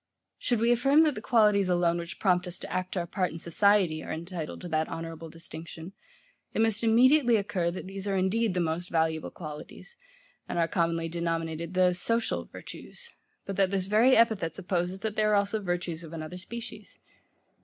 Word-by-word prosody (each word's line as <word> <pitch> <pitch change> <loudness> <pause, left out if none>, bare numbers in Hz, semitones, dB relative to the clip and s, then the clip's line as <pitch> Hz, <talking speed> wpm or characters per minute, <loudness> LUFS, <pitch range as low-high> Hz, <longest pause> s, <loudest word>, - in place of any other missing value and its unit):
Should 240 -4 0
we 230 +2 +3
affirm 275 +6 +5
that 305 -2 +2
the 215 - -6
qualities 210 -5 +3
alone, 175 -1 +2
which 170 0 -7
prompt 180 -2 +2
us 180 - -6
to - - -7
act 185 +1 -2
our 175 - 0
part 185 +1 -1
in 165 - -7
society, 175 -1 +2
are - - -6
entitled 165 0 -5
to 180 - -6
that 155 0 0
honourable 165 0 -6
distinction; 165 +2 -9 0.6
it - - +2
must 225 0 +1
immediately 240 +3 +5
occur 195 -4 0
that 175 - -6
these 195 +1 -5
are 195 -1 +1
indeed 190 +2 +1
the - - +1
most 170 +2 -2
valuable 160 -1 0
qualities, 155 - -9 0.5
and - - -3
are 165 -1 +3
commonly 165 -1 0
denominated 165 0 -3
the 180 -1 +4
SOCIAL 230 +6 -1
virtues; 475 -1 -10 0.3
but 195 - -5
that 195 -1 +3
this 190 -1 -1
very 220 +6 +5
epithet 215 -8 +2
supposes 180 +1 -2
that 220 -1 -3
there 215 -1 +2
are - - +5
also 205 +2 +1
virtues 175 -3 -3
of 165 0 -10
another 165 +2 -6
species. 235 +5 -8
185 Hz, 185 wpm, -28 LUFS, 165-215 Hz, 0.6 s, affirm